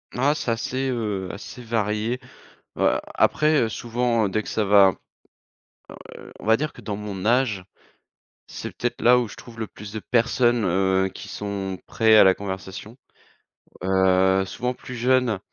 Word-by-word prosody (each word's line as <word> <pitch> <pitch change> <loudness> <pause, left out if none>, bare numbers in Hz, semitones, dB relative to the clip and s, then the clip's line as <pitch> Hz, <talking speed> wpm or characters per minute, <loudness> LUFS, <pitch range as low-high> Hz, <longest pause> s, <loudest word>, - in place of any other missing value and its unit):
Ah, 135 +4 +2
c'est 150 - -4
assez, 130 +3 -2
heu, 105 -6 -2
assez 100 +5 -9
varié. 110 +1 -1 0.6
Heu, - - +3 0.2
après, 155 0 +3
heu, 115 - -1
souvent 115 -2 0
dès 110 +3 0
que - - -12
ça 110 - 0
va, 100 -2 +6 1.2
heu, - - -12
on - - -11
va 110 +1 +5
dire 155 +3 -3
que - - -13
dans 105 - -4
mon 100 -2 -6
âge, 115 -5 +2 0.8
c'est - - -8
peut-être 120 - -3
là 125 +1 +6
où 120 -2 -1
je - - -11
trouve 115 -2 -13
le 110 - -2
plus 105 0 -11
de 110 - -4
personnes, 120 0 +2
heu, 95 +1 +2
qui - - -9
sont 100 -2 -4
prêts 110 -1 +4
à - - +8
la 95 -1 +6
conversation, 95 +3 -7 0.9
heu, 95 0 +3
souvent 125 +6 -3
plus 125 - -9
jeune 125 -3 +2
110 Hz, 165 wpm, -23 LUFS, 95-120 Hz, 1.2 s, à